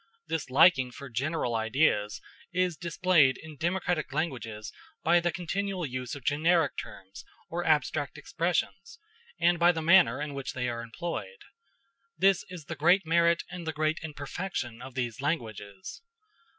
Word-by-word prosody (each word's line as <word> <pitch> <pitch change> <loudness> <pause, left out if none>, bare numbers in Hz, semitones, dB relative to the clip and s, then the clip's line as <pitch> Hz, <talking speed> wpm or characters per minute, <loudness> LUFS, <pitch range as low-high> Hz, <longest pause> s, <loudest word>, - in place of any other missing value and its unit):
This 160 -5 -3
liking 130 -1 +5
for 135 +2 -10
general 135 +1 -1
ideas 110 -2 +1 0.3
is 180 -1 +1
displayed 170 -5 +3
in 155 -1 -11
democratic 175 -1 -1
languages 120 -8 -3 0.3
by 175 +1 +5
the 175 0 0
continual 190 +1 -2
use 130 -1 -4
of 140 - -10
generic 160 +2 +2
terms 95 0 -9 0.3
or 175 +1 -2
abstract 150 -2 +1
expressions, 175 - -2 0.4
and 175 0 +3
by 170 +1 +6
the 165 -2 -4
manner 165 -7 +5
in 150 -1 -4
which 140 -1 -5
they 125 -1 -2
are 120 -1 -3
employed. 175 - -6 0.7
This 195 -1 +4
is 175 -5 -9
the 165 - -5
great 175 +6 +4
merit 170 +1 +3
and 175 -2 -7
the 160 - -1
great 155 +1 0
imperfection 145 -5 -5
of 130 0 -10
these 125 -1 -3
languages. 110 - -4
155 Hz, 150 wpm, -29 LUFS, 130-175 Hz, 0.7 s, by